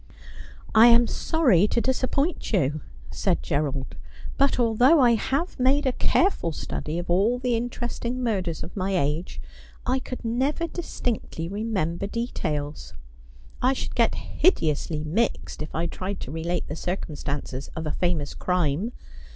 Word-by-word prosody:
' -, -, -19 dB, 0.3 s
I 220 Hz, +2 st, +8 dB
am 235 Hz, 0 st, +7 dB
sorry 235 Hz, -, +3 dB
to 235 Hz, -, +1 dB
disappoint 265 Hz, +5 st, 0 dB
you,' 150 Hz, -, +1 dB, 0.3 s
said -, -, 0 dB
Gerald; 140 Hz, -2 st, -2 dB, 0.2 s
' -, -, -11 dB
but 275 Hz, -1 st, +3 dB
although 245 Hz, +7 st, +5 dB
I 245 Hz, -3 st, +6 dB
have 275 Hz, -, -1 dB
made 275 Hz, +3 st, +3 dB
a 260 Hz, -, +3 dB
careful 340 Hz, -, +2 dB
study 155 Hz, +2 st, -4 dB
of 175 Hz, -, -4 dB
all 200 Hz, +8 st, +3 dB
the 250 Hz, -1 st, 0 dB
interesting 240 Hz, +1 st, -3 dB
murders 185 Hz, -8 st, -1 dB
of 165 Hz, -, -9 dB
my 195 Hz, -1 st, -1 dB
age 150 Hz, +3 st, -1 dB, 0.5 s
I 255 Hz, +1 st, +1 dB
could 255 Hz, -1 st, -7 dB
never 265 Hz, +8 st, 0 dB
distinctly 245 Hz, -, -3 dB
remember 195 Hz, -3 st, -2 dB
details. 150 Hz, -, -3 dB, 0.7 s
I 255 Hz, +2 st, +4 dB
should -, -, -4 dB
get -, -, +2 dB
hideously 155 Hz, -, +1 dB
mixed 185 Hz, +6 st, -1 dB
if 155 Hz, -, -6 dB
I 165 Hz, +2 st, 0 dB
tried 190 Hz, +3 st, -4 dB
to 130 Hz, -, -6 dB
relate 165 Hz, +3 st, -2 dB
the 150 Hz, -, -4 dB
circumstances 145 Hz, -6 st, -4 dB
of 160 Hz, -1 st, -4 dB
a 150 Hz, -, -1 dB
famous 165 Hz, -5 st, -1 dB
crime. 180 Hz, +4 st, 0 dB
200 Hz, 150 wpm, -25 LUFS, 160-250 Hz, 0.7 s, I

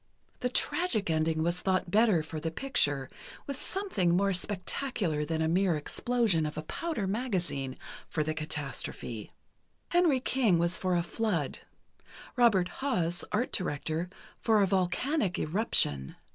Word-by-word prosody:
The 250 Hz, -, 0 dB
tragic 245 Hz, -, +1 dB
ending 160 Hz, 0 st, +1 dB
was 175 Hz, +2 st, 0 dB
thought 185 Hz, -2 st, 0 dB
better 210 Hz, -6 st, +4 dB
for 155 Hz, 0 st, -6 dB
the 165 Hz, -, -2 dB
picture, 145 Hz, -, +1 dB, 0.4 s
with 280 Hz, -, -4 dB
something 205 Hz, -, +1 dB
more 200 Hz, 0 st, +2 dB
spectacular 185 Hz, -, -1 dB
than 160 Hz, +1 st, -1 dB
a -, -, +1 dB
mere 175 Hz, 0 st, +2 dB
explosion 200 Hz, 0 st, +1 dB
of 150 Hz, -, -7 dB
a 155 Hz, -, -3 dB
powder 315 Hz, -, -3 dB
magazine 185 Hz, -, -2 dB, 0.3 s
for 155 Hz, -, 0 dB
the 155 Hz, +1 st, -1 dB
catastrophe. 145 Hz, -7 st, -4 dB, 0.6 s
Henry 345 Hz, -6 st, +4 dB
King 245 Hz, -8 st, +2 dB
was 170 Hz, +1 st, +2 dB
for 185 Hz, -1 st, 0 dB
a 170 Hz, -, +2 dB
flood; 175 Hz, -, -1 dB, 0.8 s
Robert 215 Hz, -7 st, +4 dB
Haas, 175 Hz, -11 st, 0 dB
art 225 Hz, +4 st, 0 dB
director, 165 Hz, -1 st, -2 dB, 0.3 s
for 220 Hz, -3 st, +3 dB
a -, -, +5 dB
volcanic 190 Hz, -, 0 dB
eruption. 150 Hz, -, +1 dB
180 Hz, 140 wpm, -30 LUFS, 160-225 Hz, 0.8 s, a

